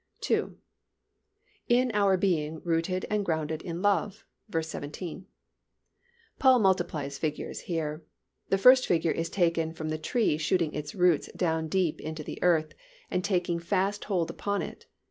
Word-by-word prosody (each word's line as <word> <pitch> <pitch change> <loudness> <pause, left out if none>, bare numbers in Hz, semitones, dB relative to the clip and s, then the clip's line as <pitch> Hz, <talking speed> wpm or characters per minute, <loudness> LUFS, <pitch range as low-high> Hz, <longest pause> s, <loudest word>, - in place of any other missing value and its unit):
II. - - +1 1.1
In 245 +1 +3
our 200 -2 +3
being 160 -5 0
rooted 170 +2 0
and 210 -1 +1
grounded 160 -3 -2
in 170 +1 -5
love 205 +1 +1 0.2
(v. 165 -4 0
17). 160 +4 -7 1.1
Paul 260 -2 +6
multiplies 175 - 0
figures 155 -2 -3
here. 160 -2 -3 0.5
The 195 - +3
first 255 +6 +7
figure 165 -1 +2
is 165 0 -2
taken 165 -3 +1
from 155 -1 -5
the 155 0 -2
tree 155 -3 +1
shooting 160 0 +1
its 150 0 -5
roots 180 -4 +3
down 160 -3 0
deep 180 -1 0
into 155 0 -5
the - - -7
earth 160 -3 +2 0.4
and 180 - 0
taking 175 -3 0
fast 195 +4 -1
hold 180 -5 0
upon 200 0 -2
it. - - -9
170 Hz, 145 wpm, -28 LUFS, 160-195 Hz, 1.1 s, first